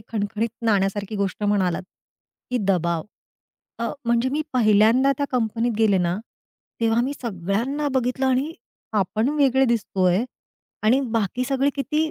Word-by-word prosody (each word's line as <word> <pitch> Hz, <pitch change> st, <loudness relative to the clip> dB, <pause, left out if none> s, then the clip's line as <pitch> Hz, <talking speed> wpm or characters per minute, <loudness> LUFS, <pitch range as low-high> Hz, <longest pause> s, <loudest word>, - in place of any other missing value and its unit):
खणखणीत 220 Hz, +1 st, -1 dB, 0.2 s
नाण्यासारखी 200 Hz, 0 st, 0 dB
गोष्ट 200 Hz, 0 st, -2 dB
म्हणालात, 195 Hz, -4 st, +1 dB, 0.7 s
की 250 Hz, -, +1 dB
दबाव. 170 Hz, -3 st, 0 dB, 0.8 s
अ, 230 Hz, 0 st, -1 dB, 0.2 s
म्हणजे 235 Hz, +2 st, +2 dB
मी 295 Hz, +4 st, -1 dB
पहिल्यांदा 230 Hz, +3 st, +4 dB
त्या 285 Hz, -, 0 dB
कंपनीत 235 Hz, -1 st, 0 dB
गेले 215 Hz, -4 st, +4 dB
ना, 175 Hz, 0 st, 0 dB, 0.6 s
तेव्हा 230 Hz, 0 st, +2 dB
मी 265 Hz, +3 st, -1 dB
सगळ्यांना 230 Hz, -, -1 dB
बघितलं 260 Hz, +1 st, 0 dB
आणि 265 Hz, +4 st, +1 dB, 0.5 s
आपण 215 Hz, +5 st, 0 dB
वेगळे 270 Hz, -2 st, +4 dB
दिसतोय 200 Hz, -4 st, +1 dB, 0.6 s
आणि 235 Hz, +5 st, +4 dB
बाकी 230 Hz, +2 st, 0 dB
सगळे 270 Hz, +1 st, +1 dB
किती 305 Hz, +3 st, 0 dB
230 Hz, 130 wpm, -23 LUFS, 200-260 Hz, 0.8 s, पहिल्यांदा